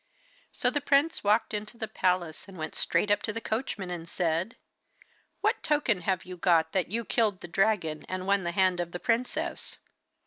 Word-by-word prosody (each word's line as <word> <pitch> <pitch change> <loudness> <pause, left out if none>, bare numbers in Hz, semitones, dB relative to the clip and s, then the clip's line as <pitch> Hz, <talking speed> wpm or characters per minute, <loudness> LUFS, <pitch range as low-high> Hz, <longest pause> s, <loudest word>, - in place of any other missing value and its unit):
So 250 -3 +2
the 290 - -1
prince 285 +3 +2
walked 215 +2 +2
into 215 +2 -5
the 220 - -3
palace, 180 -5 -1
and 195 -2 -12
went 155 -1 -4
straight 210 - +1
up 205 - +3
to 215 - -2
the 225 - -4
coachman 220 -5 -3
and 170 -1 -6
said: 170 +5 -1 0.9
'What - - +1
token 280 -10 +1
have 185 +1 -1
you 180 0 -8
got 165 -2 +3
that 185 -3 0
you 230 +3 -2
killed 210 -5 +1
the - - -6
dragon 175 -4 0
and 185 0 -3
won 200 0 +3
the 170 - -1
hand 185 -1 +2
of 170 -1 -3
the 175 - -4
princess? 235 +4 -2
195 Hz, 195 wpm, -29 LUFS, 175-220 Hz, 0.9 s, up